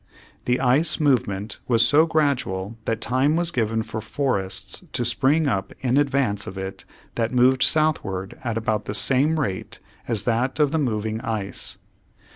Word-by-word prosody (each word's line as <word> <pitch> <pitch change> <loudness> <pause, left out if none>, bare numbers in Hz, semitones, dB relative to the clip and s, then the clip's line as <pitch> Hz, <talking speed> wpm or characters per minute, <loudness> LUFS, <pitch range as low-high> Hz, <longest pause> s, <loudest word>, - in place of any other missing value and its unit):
The 125 +1 +1
ice 145 +7 +2
movement 110 -8 0
was 115 -2 +4
so 155 +3 +4
gradual 135 - -1
that 115 0 -2
time 130 +5 +1
was 170 0 0
given 110 -3 0
for 110 0 -6
forests 100 - 0
to 120 - -1
spring 135 +6 +2
up 95 -7 -2
in 125 -1 +1
advance 135 -8 0
of 95 - -7
it 95 -1 -6 0.3
that 115 -1 -1
moved 125 +1 +3
southward 105 -14 +1
at 115 -3 -2
about 110 -2 -1
the 105 - -2
same 140 +8 +3
rate 95 -10 -4 0.3
as 115 -5 -1
that 120 +3 0
of 145 -2 +3
the 160 - 0
moving 110 -4 -2
ice. 110 -6 -3
120 Hz, 160 wpm, -23 LUFS, 105-140 Hz, 0.3 s, was